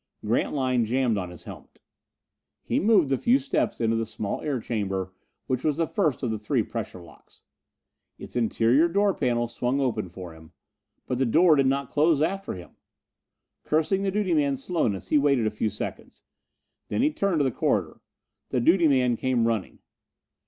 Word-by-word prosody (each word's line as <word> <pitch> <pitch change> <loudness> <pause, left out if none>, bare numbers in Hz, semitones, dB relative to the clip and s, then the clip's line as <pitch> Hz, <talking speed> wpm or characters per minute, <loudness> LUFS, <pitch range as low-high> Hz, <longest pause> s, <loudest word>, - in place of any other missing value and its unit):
Grantline 125 +2 +1
jammed 120 0 +1
on 90 -3 -3
his 90 - -12
helmet. - - -12 0.8
He - - 0
moved 195 -8 +4
the 135 - +1
few 245 +3 +4
steps 275 - -1
into 115 -1 +1
the 115 -1 -1
small 105 -2 -4
air 145 -4 -2
chamber 95 -5 -3 0.3
which 130 -1 -2
was 150 -3 0
the 165 - +1
first 155 - -1
of 120 - 0
the 110 - -3
three 105 - 0
pressure - - -6
locks. 85 -3 -18 0.7
Its - - -11
interior 120 +5 +3
door 200 +3 +2
panel 120 -5 0
swung 125 +3 -2
open 110 -8 -1
for 90 -1 -9
him. 80 0 -16 0.5
But 125 - -3
the 135 - +2
door 160 +6 +5
did 135 -2 +3
not 135 0 -1
close 155 0 +3
after 195 +6 -1
him! 90 -1 -11 0.9
Cursing 160 +5 +1
the 200 - 0
duty 195 -2 0
man's 140 -3 +1
slowness, 100 - -1
he 150 - +4
waited 140 -5 +2
a 110 - 0
few 105 +1 -1
seconds. 105 - -7 0.6
Then - - 0
he 300 - +3
turned 200 - 0
to - - +3
the 135 - +1
corridor. - - -1 0.5
The 125 - 0
duty 165 +7 +4
man 125 -4 +2
came 125 -2 +1
running. 115 -4 -2
130 Hz, 180 wpm, -26 LUFS, 110-160 Hz, 0.9 s, door